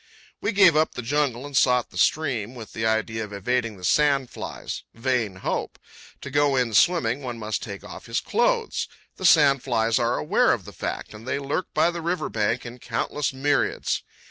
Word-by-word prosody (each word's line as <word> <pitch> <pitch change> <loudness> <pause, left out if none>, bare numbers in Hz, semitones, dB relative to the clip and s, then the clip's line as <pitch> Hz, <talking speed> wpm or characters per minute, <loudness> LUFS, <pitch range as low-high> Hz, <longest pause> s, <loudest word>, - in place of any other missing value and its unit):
We 205 - 0
gave 195 -6 +6
up 155 +1 +2
the 125 - -4
jungle 135 -1 0
and 145 -1 -8
sought 125 -2 +3
the - - -10
stream 125 -3 +1
with 115 -3 -10
the 110 0 -1
idea 110 0 0
of 105 - -8
evading 115 +2 -1
the 90 - -14
sand 140 +3 +2
flies. - - -6
Vain 115 -4 0
hope! 95 - -3 0.4
To 140 - -7
go 145 0 +3
in 125 -3 +1
swimming 135 - +3
one 125 -3 -5
must 110 -1 -3
take 100 -2 -7
off 105 - -10
his 115 +1 0
clothes. 470 0 0 0.3
The 185 - -4
sand 140 -5 +6
flies 115 -2 +1
are 120 0 +1
aware 75 - +3
of - - -4
the - - -10
fact, - - -5
and 110 +3 -11
they 130 - 0
lurk 140 +6 -2
by 160 +3 +4
the 170 -1 -5
river 175 +2 -1
bank 115 +3 -1
in 120 +1 -8
countless 150 +4 -2
myriads. 145 +2 0
125 Hz, 195 wpm, -24 LUFS, 115-145 Hz, 0.4 s, gave